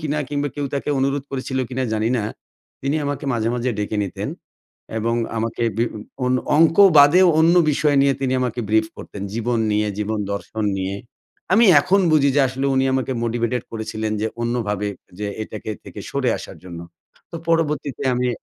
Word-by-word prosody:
কিনা? 150 Hz, -1 st, -2 dB
কিংবা 145 Hz, 0 st, -1 dB
কেউ 145 Hz, -1 st, -1 dB
তাকে 140 Hz, -, -3 dB
অনুরোধ 135 Hz, +1 st, 0 dB
করেছিল 130 Hz, -1 st, -3 dB
কিনা, 130 Hz, 0 st, -2 dB
জানি 110 Hz, +1 st, +1 dB
না। -, -, -1 dB, 0.6 s
তিনি 140 Hz, +3 st, 0 dB
আমাকে 145 Hz, -1 st, -3 dB
মাঝে, 115 Hz, -1 st, 0 dB
মাঝে 125 Hz, +1 st, -1 dB
ডেকে 105 Hz, +1 st, -2 dB
নিতেন 95 Hz, -, -5 dB, 0.7 s
এবং 115 Hz, +2 st, 0 dB, 0.2 s
আমাকে 115 Hz, +1 st, -2 dB
বিব 115 Hz, +1 st, 0 dB, 0.3 s
অন 125 Hz, -, +2 dB, 0.2 s
অঙ্কও 165 Hz, +5 st, +6 dB
বাদেও 175 Hz, +6 st, +7 dB
অন্য 165 Hz, +2 st, +5 dB, 0.2 s
বিষয় 145 Hz, 0 st, +2 dB
নিয়ে 140 Hz, 0 st, +3 dB
তিনি 130 Hz, -1 st, 0 dB
আমাকে 125 Hz, -1 st, -2 dB
ব্রিফ 110 Hz, +1 st, +3 dB
করতেন। 100 Hz, -, -8 dB
জীবন 115 Hz, +1 st, 0 dB
নিয়ে, 105 Hz, 0 st, +1 dB
জীবন 105 Hz, +1 st, -1 dB
দর্শন 110 Hz, +2 st, -4 dB
নিয়ে। 95 Hz, +1 st, -2 dB, 0.6 s
আমি 225 Hz, +5 st, +6 dB, 0.2 s
এখন 195 Hz, +7 st, +2 dB
বুঝি 145 Hz, -2 st, +4 dB
যে -, -, +6 dB
আসলে 135 Hz, +2 st, -2 dB
উনি 130 Hz, 0 st, +2 dB
আমাকে 130 Hz, 0 st, -1 dB
মোটিভেটেড 115 Hz, +1 st, -1 dB
করেছিলেন 110 Hz, -1 st, -3 dB
যে 110 Hz, -, 0 dB, 0.2 s
অন্যভাবে, 105 Hz, -4 st, -1 dB, 0.3 s
যে 105 Hz, -, -3 dB, 0.2 s
এটাকে 110 Hz, 0 st, -7 dB
থেকে -, -, -9 dB
সরে -, -, 0 dB
আসার -, -, -9 dB
জন্য। 85 Hz, -2 st, -8 dB, 0.5 s
তো -, -, -6 dB
পরবর্তীতে 150 Hz, -4 st, 0 dB
আমি 125 Hz, 0 st, 0 dB
125 Hz, 175 wpm, -21 LUFS, 110-145 Hz, 0.7 s, বাদেও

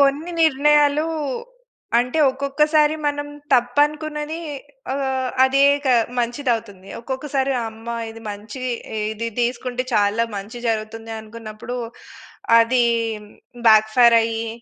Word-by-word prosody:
కొన్ని 285 Hz, +5 st, +2 dB
నిర్ణయాలు 295 Hz, +1 st, +3 dB, 0.9 s
అంటే, 250 Hz, +5 st, 0 dB
ఒక్కొక్కసారి 300 Hz, +3 st, +2 dB
మనం 290 Hz, 0 st, -2 dB, 0.2 s
తప్పనుకున్నది 295 Hz, +5 st, +1 dB, 0.5 s
ఆహ్, 265 Hz, -2 st, -1 dB
అదే 270 Hz, +1 st, +3 dB, 0.2 s
ఇక 280 Hz, -2 st, -3 dB, 0.3 s
మంచిదవుతుంది. 230 Hz, -6 st, -2 dB
ఒక్కొక్కసారి 270 Hz, +2 st, -2 dB, 0.2 s
అమ్మ! 225 Hz, +1 st, -13 dB, 0.2 s
ఇది 225 Hz, 0 st, -11 dB
మంచి, 210 Hz, +5 st, -8 dB, 0.5 s
ఇది 230 Hz, +2 st, -4 dB
తీసుకుంటే 250 Hz, +1 st, -2 dB
చాలా 210 Hz, +2 st, +2 dB
మంచి 205 Hz, +4 st, -7 dB
జరుగుతుంది, 225 Hz, 0 st, -3 dB
అనుకున్నప్పుడు 220 Hz, +2 st, -8 dB, 0.8 s
అది 240 Hz, +2 st, +3 dB, 0.8 s
బ్యాక్ 220 Hz, 0 st, +6 dB
ఫైర్ 235 Hz, -2 st, +7 dB
అయ్యి 225 Hz, 0 st, -2 dB
250 Hz, 100 wpm, -21 LUFS, 225-285 Hz, 0.9 s, ఫైర్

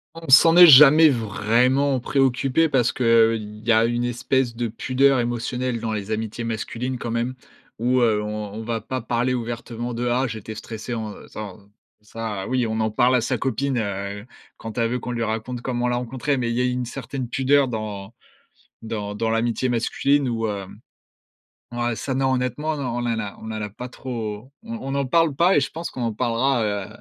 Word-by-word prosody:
On 165 Hz, -4 st, -9 dB
s'en 165 Hz, +5 st, +7 dB
est 175 Hz, -1 st, +11 dB
jamais 150 Hz, +3 st, +9 dB
vraiment 125 Hz, +4 st, +1 dB
préoccupés 135 Hz, +4 st, +1 dB
parce 125 Hz, -4 st, +2 dB
qu'il 115 Hz, -3 st, +2 dB
y 115 Hz, -, +3 dB
a 110 Hz, 0 st, +5 dB
une 120 Hz, +1 st, -1 dB
espèce 120 Hz, 0 st, 0 dB
de 120 Hz, 0 st, -2 dB
pudeur 130 Hz, +4 st, +2 dB
émotionnelle 120 Hz, +1 st, -2 dB
dans 110 Hz, 0 st, -3 dB
les 105 Hz, 0 st, -4 dB
amitiés 110 Hz, +1 st, -3 dB
masculines 115 Hz, +3 st, -3 dB
quand 120 Hz, -1 st, -5 dB
même, 120 Hz, +2 st, -2 dB, 0.4 s
où, 125 Hz, +3 st, +1 dB
heu, 110 Hz, -3 st, +2 dB
on 105 Hz, -1 st, -5 dB
on 110 Hz, -, -6 dB
va 115 Hz, 0 st, -3 dB
pas 130 Hz, -1 st, -4 dB
parler 120 Hz, +2 st, 0 dB
ouvertement 120 Hz, 0 st, -4 dB
de: 120 Hz, +1 st, -2 dB
«Ah, 130 Hz, +2 st, +1 dB
j'étais 110 Hz, -1 st, -7 dB
stressé, 110 Hz, +2 st, -7 dB
en 110 Hz, -2 st, -4 dB
heu, -, -, -13 dB
s'en» 105 Hz, -2 st, -8 dB, 0.4 s
ça, 105 Hz, -2 st, -5 dB
oui, 125 Hz, -2 st, 0 dB
on 110 Hz, 0 st, -2 dB
en 110 Hz, 0 st, +1 dB
parle 125 Hz, +4 st, +3 dB
à 125 Hz, -, +3 dB
sa 125 Hz, +2 st, -1 dB
copine, 135 Hz, +2 st, -1 dB
heu, 100 Hz, 0 st, -4 dB, 0.3 s
quand 110 Hz, +1 st, -8 dB
elle 115 Hz, -1 st, +1 dB
veut 125 Hz, -, -1 dB
qu'on 125 Hz, -, -5 dB
lui 115 Hz, -1 st, -2 dB
raconte 115 Hz, +2 st, -3 dB
comment 125 Hz, -1 st, -2 dB
on -, -, +2 dB
l'a 120 Hz, -, 0 dB
rencontrée, 130 Hz, +4 st, -2 dB
mais 120 Hz, -2 st, -1 dB
il -, -, -2 dB
y 125 Hz, -, +1 dB
a -, -, +2 dB
eu 125 Hz, -, +1 dB
une 125 Hz, 0 st, -2 dB
certaine 130 Hz, +1 st, -6 dB
pudeur 135 Hz, +2 st, +2 dB
dans 110 Hz, -2 st, -5 dB, 0.7 s
dans 105 Hz, -2 st, -5 dB
dans 110 Hz, +1 st, -1 dB
l'amitié 115 Hz, +3 st, 0 dB
masculine 135 Hz, +4 st, +1 dB
où, 115 Hz, -1 st, -1 dB
hem, 100 Hz, -3 st, -6 dB, 0.9 s
ouais, 120 Hz, 0 st, -1 dB
ça, 130 Hz, +5 st, -3 dB
non, 130 Hz, 0 st, +1 dB
honnêtement, 145 Hz, +5 st, -1 dB
non, 140 Hz, -, -4 dB
on 120 Hz, +1 st, -3 dB
en 115 Hz, -1 st, -1 dB
a 105 Hz, -3 st, -5 dB
on -, -, -11 dB
en 110 Hz, -, -4 dB
a 105 Hz, -, -4 dB
pas 125 Hz, +5 st, -8 dB
trop, 115 Hz, -1 st, -6 dB
on 230 Hz, 0 st, -6 dB
on 135 Hz, -, -5 dB
n'en 140 Hz, -1 st, 0 dB
parle 165 Hz, +1 st, +2 dB
pas 175 Hz, +6 st, +4 dB
et -, -, +6 dB
je 135 Hz, -, -1 dB
pense 165 Hz, +1 st, -6 dB
qu'on 125 Hz, -, -6 dB
en 115 Hz, -2 st, -1 dB
parlera, 120 Hz, +2 st, +1 dB
heu, 100 Hz, -2 st, -2 dB
120 Hz, 210 wpm, -23 LUFS, 110-130 Hz, 0.9 s, est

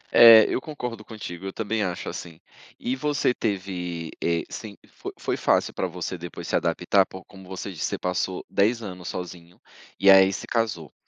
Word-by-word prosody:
É, 115 Hz, -2 st, +10 dB
eu -, -, -1 dB
concordo 125 Hz, -8 st, -6 dB
contigo, 95 Hz, -5 st, -8 dB
eu -, -, -4 dB
também 110 Hz, 0 st, -2 dB
acho 90 Hz, -2 st, -3 dB
assim. 80 Hz, -2 st, -7 dB, 0.4 s
E 125 Hz, -, -1 dB
você 140 Hz, -2 st, +1 dB
teve 90 Hz, -7 st, -3 dB
eh, 85 Hz, -1 st, +1 dB
semp 105 Hz, -3 st, -8 dB
fo -, -, -8 dB
foi -, -, -2 dB
fácil -, -, +1 dB
pra 95 Hz, -, -1 dB
você 90 Hz, 0 st, -5 dB
depois 85 Hz, 0 st, -8 dB
se -, -, 0 dB
adaptar? 90 Hz, +3 st, +2 dB
Pô, 95 Hz, 0 st, -11 dB
como 95 Hz, -2 st, -14 dB
você 95 Hz, +1 st, -5 dB
disse, 85 Hz, -, -3 dB
você -, -, -2 dB
passou 90 Hz, 0 st, -2 dB
10 115 Hz, +4 st, +1 dB
anos 90 Hz, -4 st, -7 dB
sozinho 90 Hz, -1 st, -7 dB, 0.4 s
e 100 Hz, -, +7 dB
aí 95 Hz, 0 st, +7 dB
se 95 Hz, -, -5 dB
casou. 105 Hz, -, -2 dB
95 Hz, 185 wpm, -25 LUFS, 90-110 Hz, 0.4 s, É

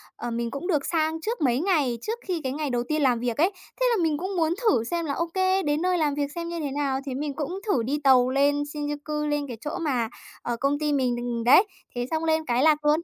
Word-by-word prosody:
ờ, 240 Hz, +1 st, -5 dB
mình 235 Hz, 0 st, -2 dB
cũng 280 Hz, +6 st, -5 dB
được 300 Hz, -7 st, +1 dB
sang 320 Hz, -1 st, 0 dB
trước 450 Hz, +4 st, -3 dB
mấy 250 Hz, -3 st, +2 dB
ngày, 300 Hz, -9 st, +1 dB
trước 450 Hz, -, -3 dB
khi 355 Hz, -4 st, -1 dB
cái 260 Hz, -, -1 dB
ngày 300 Hz, 0 st, -2 dB
đầu 240 Hz, -1 st, 0 dB
tiên 305 Hz, 0 st, +1 dB
làm 250 Hz, -4 st, +3 dB
việc 240 Hz, -1 st, -2 dB
ấy, 345 Hz, +6 st, +3 dB, 0.3 s
thế -, -, +4 dB
là 430 Hz, -7 st, +2 dB
mình 310 Hz, -2 st, +1 dB
cũng 375 Hz, +5 st, -4 dB
muốn 325 Hz, -1 st, +2 dB
thử 430 Hz, -, +3 dB
xem 335 Hz, +7 st, -2 dB
là, 285 Hz, -, -1 dB
ô 335 Hz, -, 0 dB
kê, 375 Hz, 0 st, +2 dB
đến 295 Hz, +1 st, 0 dB
nơi 365 Hz, 0 st, +2 dB
làm 300 Hz, -3 st, +1 dB
việc 290 Hz, -1 st, -2 dB
xem 335 Hz, 0 st, -4 dB
như 340 Hz, 0 st, -4 dB
thế 290 Hz, -3 st, -3 dB
nào, 275 Hz, -1 st, -1 dB
thế 270 Hz, -, -4 dB
mình 290 Hz, +1 st, -3 dB
cũng 320 Hz, +6 st, -3 dB
thử 260 Hz, -, +2 dB
đi 275 Hz, +6 st, -1 dB
tàu 255 Hz, -2 st, +5 dB
lên 285 Hz, +2 st, +2 dB
Shinjuku, 295 Hz, +1 st, -3 dB
lên 295 Hz, -1 st, -1 dB
cái 240 Hz, -3 st, -7 dB
chỗ 300 Hz, -, -4 dB
mà, 255 Hz, -9 st, 0 dB, 0.3 s
ờ, 240 Hz, -, -2 dB
công 280 Hz, +1 st, +1 dB
ty 300 Hz, -1 st, 0 dB
mình 255 Hz, -3 st, +1 dB
đ 240 Hz, -, -4 dB, 0.2 s
đấy, 265 Hz, +10 st, +8 dB, 0.3 s
thế 245 Hz, 0 st, -1 dB
xong 320 Hz, 0 st, 0 dB
lên 320 Hz, -1 st, +1 dB
cái 245 Hz, 0 st, +1 dB
lạc 300 Hz, -1 st, +3 dB
luôn. 300 Hz, +2 st, +4 dB
295 Hz, 270 wpm, -25 LUFS, 265-325 Hz, 0.3 s, đấy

